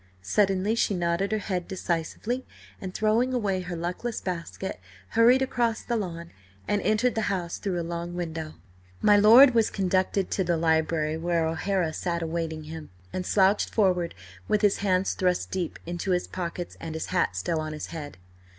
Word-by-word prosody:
Suddenly 195 - +2
she 220 -3 +1
nodded 175 +3 0
her 215 - +2
head 185 -4 -3
decisively, 190 +7 -2 0.4
and 190 - -5
throwing 225 +6 +1
away 200 -6 0
her 180 -1 -5
luckless 180 +8 -3
basket, 180 - -5 0.3
hurried 240 +4 +5
across 235 -3 0
the 240 - -1
lawn 170 -5 -4 0.4
and 205 -1 +1
entered 215 +5 +2
the 220 - -1
house 180 -3 -2
through 185 -3 -2
a - - -2
long 170 +1 -4
window. 160 -3 -4 0.4
My 210 - +5
lord 235 +6 +8
was 225 -2 +3
conducted 190 0 0
to 190 - +1
the 170 -1 +1
library, 160 -1 +1
where 170 0 0
O'Hara 165 +1 0
sat 170 0 -2
awaiting 160 -1 -3
him, 160 0 -8 0.2
and 180 -1 -3
slouched 195 +1 +3
forward 180 -5 +1 0.3
with 210 0 +1
his 205 -1 +4
hands 190 -1 +1
thrust 180 -1 0
deep 180 -3 -3
into 175 +2 -4
his 180 -1 +1
pockets 175 -1 -5
and 160 -1 -6
his 160 - -3
hat 175 - +1
still 125 - -1
on 155 0 -4
his 150 - -5
head. 145 - -7
180 Hz, 175 wpm, -27 LUFS, 165-205 Hz, 0.4 s, lord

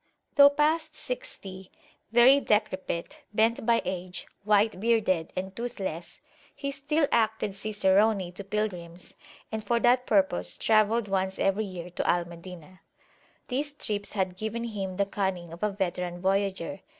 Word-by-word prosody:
Though 280 0 +9
past 305 +2 +1
sixty, 195 - -7 0.4
very 245 +4 +7
decrepit, 210 - -1 0.2
bent 225 +2 +2
by 235 -1 +3
age, 185 0 -5 0.2
white 210 0 +3
bearded, 205 -7 +1
and 190 +1 -4
toothless, 195 -8 -5 0.3
he 280 -1 -3
still 290 +2 0
acted 220 -3 +1
cicerone 200 -1 +2
to 190 +3 -7
pilgrims, 185 -4 -4 0.4
and 220 -1 -3
for 235 +1 +1
that 250 +1 +3
purpose 190 - +1
travelled 215 0 +3
once 190 -1 -1
every 195 +3 +1
year 180 -2 -7
to - - -2
Al 175 -1 +2
Madinah. 175 +1 -11 0.7
These 285 +3 -2
trips 205 -7 -4
had 190 -3 -1
given 220 +3 -3
him 195 -5 -4
the 200 - +2
cunning 190 -4 -3
of 170 - -11
a 210 - +2
veteran 180 -3 -3
voyageur. 190 -1 -1
200 Hz, 140 wpm, -28 LUFS, 185-230 Hz, 0.7 s, Though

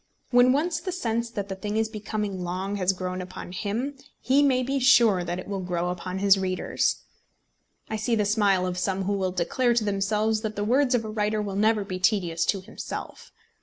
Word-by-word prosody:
When 245 0 +6
once 315 +5 +1
the 370 - -4
sense 235 -9 -2
that 205 -4 -4
the 195 - -4
thing 205 +3 -4
is 220 0 +2
becoming 210 -3 -4
long 190 +3 -3
has 185 -1 +2
grown 185 0 -4
upon 180 -1 -8
him, 235 +9 -3 0.2
he 265 +4 +3
may 260 -3 +3
be 270 +2 -1
sure 235 -8 +5
that 175 +1 -3
it 185 - -7
will 200 -1 -3
grow 180 -1 -2
upon 180 +1 -5
his 195 0 +4
readers. 185 -1 -1 0.8
I 220 - -3
see 225 +2 0
the 210 -2 +1
smile 200 -3 +2
of 180 0 -2
some 190 +1 -1
who 200 +2 0
will 190 -2 -1
declare 235 +8 +1
to 230 - +2
themselves 210 +2 0
that 215 -1 -4
the 205 - -2
words 255 +4 +3
of 225 -2 0
a - - -5
writer 215 0 0
will 200 -2 -3
never 215 +1 +2
be 185 -2 -5
tedious 175 -4 +1
to 195 - 0
himself. 190 - -8
205 Hz, 210 wpm, -26 LUFS, 185-230 Hz, 0.8 s, When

